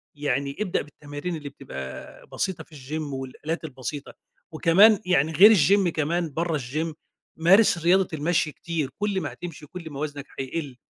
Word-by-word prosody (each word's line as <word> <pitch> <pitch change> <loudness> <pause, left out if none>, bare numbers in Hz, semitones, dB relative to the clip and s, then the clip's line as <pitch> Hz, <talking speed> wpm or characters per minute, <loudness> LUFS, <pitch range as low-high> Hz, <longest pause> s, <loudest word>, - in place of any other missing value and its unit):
يعني 140 -1 -1
ابدأ 210 -4 0
بالتمارين 145 +3 -6
اللي 145 -2 -7
بتبقى 65 - -9
بسيطة 190 -2 -3
في 155 - -17
الgym 145 +2 -5
والآلات 135 +5 -5
البسيطة، 140 0 -6 0.4
وكمان 185 +6 +6
يعني 160 -4 +2
غير 210 +7 +8
الgym 190 +4 +4
كمان 165 +1 -1
برّه، 165 +1 0
الgym 150 +5 -3 0.4
مارِس 185 +4 +5
رياضة 185 +1 +4
المشي 160 +1 0
كتير، 160 -3 -3
كل 205 -2 0
ما 155 - -4
هتمشي 165 -4 -8
كل 170 +2 -9
ما 140 -2 -8
وَزنك 145 -2 -4
هيقِلّ، 135 0 -4
155 Hz, 155 wpm, -25 LUFS, 145-175 Hz, 0.4 s, غير